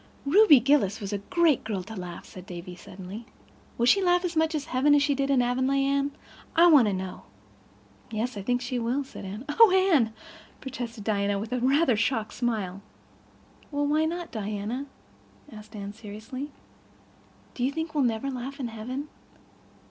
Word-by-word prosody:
"Ruby 320 - +7
Gillis 240 -6 +2
was 200 -1 -5
a 200 - -1
great 320 - +2
girl 205 -4 -3
to 220 +4 -9
laugh," 180 -3 -7
said 185 -1 -12
Davy 180 0 -8
suddenly. 190 +5 -10 0.5
"Will 235 - +2
she 395 +11 +5
laugh 355 -1 +3
as 350 -1 -3
much 320 0 +2
in 300 - 0
heaven 290 0 +3
as 285 - +4
she 295 -1 +2
did 275 0 -1
in 265 -3 +4
Avonlea, 260 +3 +1
Anne? 280 +1 +1 0.4
I 335 +1 +7
want 295 -9 +7
to 205 - 0
know." 185 -1 -5 0.9
"Yes, 225 +3 -3
I 200 - -5
think 245 +5 0
she 250 0 -2
will," 245 +5 -1
said 260 - -10
Anne. 205 +7 -7
"Oh, 440 +9 +6
Anne," 365 - +4 0.5
protested 245 -5 -6
Diana, 200 -1 0
with 215 +3 -5
a 250 - 0
rather 270 +1 +3
shocked 220 -1 0
smile. 210 -6 -2 0.9
"Well, 290 -1 -1
why 305 +2 +2
not, 340 +1 -4
Diana?" 215 +5 -4 0.6
asked 215 0 -12
Anne 200 -1 -6
seriously. 225 +6 -7 1.0
"Do 245 - -4
you 260 - +2
think 320 +2 -4
we'll 295 -3 +2
never 240 +3 0
laugh 265 +3 -6
in 250 -3 -3
heaven?" 250 +6 -5
250 Hz, 180 wpm, -27 LUFS, 215-285 Hz, 1.0 s, Ruby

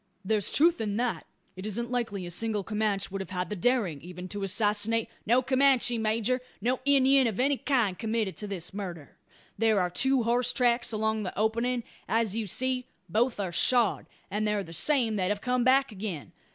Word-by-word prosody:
"There's 210 0 +2
truth 335 -2 +3
in 205 -1 -2
that. 240 -1 -2 0.3
It 185 - -8
isn't 235 +3 -3
likely 225 -7 -2
a 175 - -5
single 215 +2 -1
Comanch 210 -2 -1
would 195 0 -3
have 195 - -7
had 180 -1 -3
the - - -1
daring, 195 - 0
even 180 +2 -8
to 205 +1 -5
assassinate 210 +3 +1
" - - -38
"No 245 +3 +4
Comanche, 260 -2 +3
major, 225 +3 0 0.2
no 245 +5 0
Indyin 270 -2 +5
of 220 -2 -3
any 280 +3 +3
kind 235 -11 0
committed 220 -3 -1
this 180 -3 -5
murder. 175 -7 -7 0.4
There 220 -2 +3
are 180 -1 0
two 265 +5 +2
horse 245 +2 +1
tracks 240 -1 +2
along 220 0 0
the 185 -3 -5
opening. 230 +3 0 0.3
As 225 -2 +1
you 225 -2 -2
see, 255 +5 -1 0.2
both 230 +5 +1
are 190 -3 -2
shod; 235 +4 +2 0.2
and 210 +2 -1
they're 210 -1 0
the 165 - -11
same 235 - +2
that 185 -1 0
have 205 0 -1
come 250 -1 +1
back 265 +1 +4
again. 190 -7 -6
220 Hz, 190 wpm, -28 LUFS, 200-245 Hz, 0.4 s, Indyin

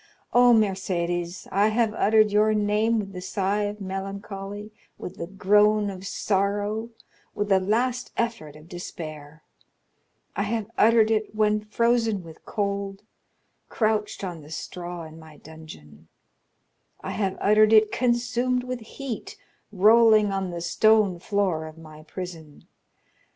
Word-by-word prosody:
Oh, 245 0 +6
Mercédès, 180 -5 0
I 200 +2 +3
have 220 0 +1
uttered 215 0 +3
your 215 +1 +3
name 210 +2 +1
with 195 -2 -4
the 180 - -6
sigh 200 +2 -1
of 205 +1 -5
melancholy, 195 +1 -6 0.3
with - - -8
the 170 - -5
groan 205 +2 +3
of 190 0 -8
sorrow, 205 +3 -1 0.5
with 205 0 -2
the 195 -1 +5
last 240 +6 -1
effort 230 -11 -3
of 155 +1 -15
despair; 155 -3 -8 0.9
I 200 - -1
have 220 +1 -2
uttered 225 0 +4
it 215 -1 -1
when 215 0 +2
frozen 225 -2 +1
with 165 -1 -14
cold, 200 -1 -3 0.7
crouched 215 -2 -1
on 175 -4 -5
the 150 - -14
straw 175 +2 -6
in 160 0 -11
my 160 -2 -14
dungeon; 80 - -13 0.9
I - - -5
have 195 -3 -2
uttered 215 +1 +4
it, 215 -1 +5
consumed 245 0 0
with 255 0 -4
heat, 240 +1 -7 0.3
rolling 215 +1 +5
on 195 -1 -2
the 170 -1 -5
stone 205 +1 +3
floor 185 -5 -1
of 155 0 -12
my 155 -1 -13
prison. 165 -2 -9
205 Hz, 135 wpm, -25 LUFS, 175-215 Hz, 0.9 s, Oh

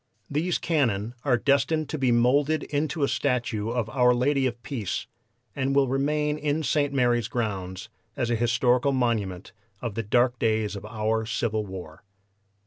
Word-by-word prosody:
These 165 +5 0
cannon 120 - 0
are 130 -4 +3
destined 145 +4 +1
to 155 - -3
be 130 -2 +2
moulded 140 +6 +3
into 150 +1 -1
a - - +3
statue 120 -7 -1
of 120 -2 -1
'Our 125 +1 +3
Lady 135 +2 +2
of 120 -1 -5
Peace,' 135 - -3 0.5
and 135 0 0
will 140 -1 +4
remain 150 +3 0
in 150 +1 0
St. 145 +1 +1
Mary's 120 -4 +2
grounds 95 -6 -3 0.3
as 120 -1 0
an 120 - +2
historical 120 +3 +2
monument 110 -8 -1 0.3
of 120 -2 -4
the 115 - -2
dark 120 +3 +2
days 110 -2 0
of 100 0 -7
our 110 0 -1
civil 110 -3 -1
war." 90 -5 -9
125 Hz, 160 wpm, -26 LUFS, 110-140 Hz, 0.5 s, will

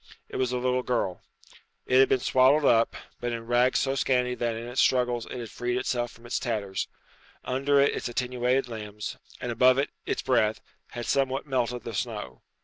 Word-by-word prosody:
It - - -5
was 130 -1 0
a 125 - 0
little 125 0 +1
girl. 115 -8 -1 0.6
It 130 - +4
had 135 - +6
been 130 - +3
swaddled 130 +4 +4
up, 115 -2 +4 0.2
but 120 0 -2
in 115 -1 -4
rags 120 +2 +3
so 135 - +1
scanty 125 -2 +1
that 120 -2 -1
in 115 +1 -6
its 125 +2 +1
struggles 125 -2 +2
it - - -7
had 115 -3 -6
freed 120 0 -2
itself 120 -1 -1
from 115 0 -17
its 120 - -1
tatters. 105 -5 -2 0.6
Under 140 +2 +2
it 140 - +3
its - - -3
attenuated 125 +1 0
limbs, 105 -3 -6 0.2
and 120 - -3
above 125 +2 +5
it 140 - 0 0.2
its - - -1
breath, 110 -4 +2 0.3
had 120 -1 -5
somewhat 135 -1 0
melted 125 -3 -1
the 115 - -6
snow. 105 - -4
125 Hz, 195 wpm, -27 LUFS, 115-130 Hz, 0.6 s, had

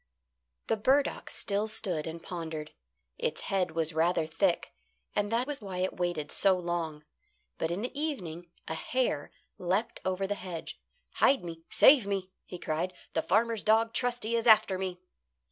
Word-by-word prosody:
The 225 - +1
burdock 270 +6 +2
still 205 +2 -1
stood 190 -8 0
and 165 +1 -6
pondered. 160 -3 -5 0.5
Its - - -1
head 185 -4 -1
was 165 -1 0
rather 165 +1 +2
thick, 170 +3 0 0.4
and 205 +1 0
that 235 +2 +2
was 290 -2 -3
why 195 -3 -6
it 185 +1 -1
waited 175 -4 -1
so 195 -2 +4
long. 170 -4 -3 0.6
But 160 - 0
in 180 +5 -2
the 250 - -3
evening 175 - -4 0.2
a - - -2
hare 160 - -1 0.3
leapt 190 +6 -1
over 190 +1 0
the 200 - -1
hedge. 180 -4 -7 0.4
"Hide 270 -6 +4
me! 165 -1 -7
Save 260 -7 +7
me!" 195 -2 -2
he 180 - -7
cried. 170 +2 -2 0.2
"The 160 - +1
farmer's 225 +3 +1
dog 225 +1 +3
Trusty 240 -2 0
is 230 +1 0
after 215 -4 +6
me." 185 -2 -3
185 Hz, 160 wpm, -30 LUFS, 165-220 Hz, 0.6 s, Save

